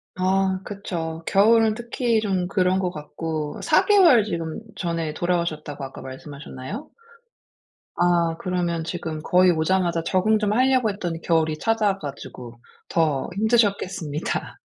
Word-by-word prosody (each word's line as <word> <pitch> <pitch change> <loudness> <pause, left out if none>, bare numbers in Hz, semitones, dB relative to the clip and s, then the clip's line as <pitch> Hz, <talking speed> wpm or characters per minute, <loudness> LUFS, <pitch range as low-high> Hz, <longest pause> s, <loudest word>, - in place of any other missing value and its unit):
아 190 0 +1
그쵸. 170 -6 -5
겨울은 220 +2 +4
특히 235 0 0
좀 190 -4 0
그런 185 0 +1
것 185 -2 0
같고 155 -1 -5
4 - - +3
개월 360 - +6
지금 165 -6 -4 0.2
전에 165 -3 -2
돌아오셨다고 155 -4 -2
아까 135 - -8
말씀하셨나요? 140 - -8 1.1
아 170 -1 +2
그러면 175 -2 -1
지금 160 -2 -4
거의 180 +2 +4
오자마자 170 0 +1
적응 195 +5 +2
좀 210 -1 +1
하려고 255 -2 +3
했더니 175 -5 -4
겨울이 160 -2 +1
찾아와 210 0 +1
가지고 125 -6 -9 0.3
더 155 -5 +1
힘드셨겠습니다. 200 -8 0
175 Hz, 295 characters per minute, -23 LUFS, 160-205 Hz, 1.1 s, 개월